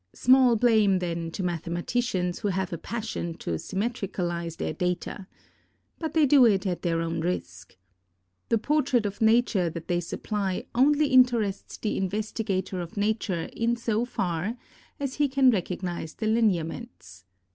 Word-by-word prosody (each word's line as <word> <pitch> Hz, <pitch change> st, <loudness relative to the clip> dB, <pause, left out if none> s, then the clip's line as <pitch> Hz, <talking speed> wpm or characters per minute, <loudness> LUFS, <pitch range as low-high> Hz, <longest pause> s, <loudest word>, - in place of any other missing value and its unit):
Small 255 Hz, -1 st, +5 dB
blame, 215 Hz, -4 st, +4 dB
then, 170 Hz, -2 st, -3 dB
to 185 Hz, -, -5 dB
mathematicians 180 Hz, +3 st, -1 dB
who -, -, -2 dB
have 190 Hz, -2 st, -1 dB
a -, -, -2 dB
passion 215 Hz, -6 st, -4 dB
to 85 Hz, -, -5 dB
symmetricalize 185 Hz, -6 st, -3 dB
their -, -, -2 dB
data. 180 Hz, +3 st, -3 dB, 0.7 s
But 320 Hz, -1 st, -4 dB
they 315 Hz, -2 st, +5 dB
do 280 Hz, -1 st, +6 dB
it 200 Hz, -2 st, +2 dB
at 180 Hz, -2 st, -2 dB
their 165 Hz, -2 st, 0 dB
own 165 Hz, 0 st, -2 dB
risk. 95 Hz, -, -4 dB, 0.7 s
The 230 Hz, -, +3 dB
portrait 265 Hz, -2 st, +1 dB
of 205 Hz, +1 st, -4 dB
Nature 220 Hz, -5 st, +3 dB
that 165 Hz, 0 st, -8 dB
they 175 Hz, 0 st, +1 dB
supply, 190 Hz, +2 st, -3 dB
only 290 Hz, +4 st, +4 dB
interests 240 Hz, -6 st, +2 dB
the 215 Hz, -, -2 dB
investigator 195 Hz, -1 st, -2 dB
of 170 Hz, +3 st, -8 dB
Nature 205 Hz, -5 st, -1 dB
in 230 Hz, +1 st, 0 dB
so 230 Hz, -1 st, -1 dB
far 190 Hz, -1 st, -2 dB, 0.4 s
as 275 Hz, -2 st, -3 dB
he 290 Hz, 0 st, +3 dB
can 265 Hz, -1 st, +5 dB
recognize 180 Hz, -4 st, -3 dB
the 220 Hz, -, -4 dB
lineaments. 215 Hz, -, -1 dB
200 Hz, 145 wpm, -27 LUFS, 175-235 Hz, 0.7 s, do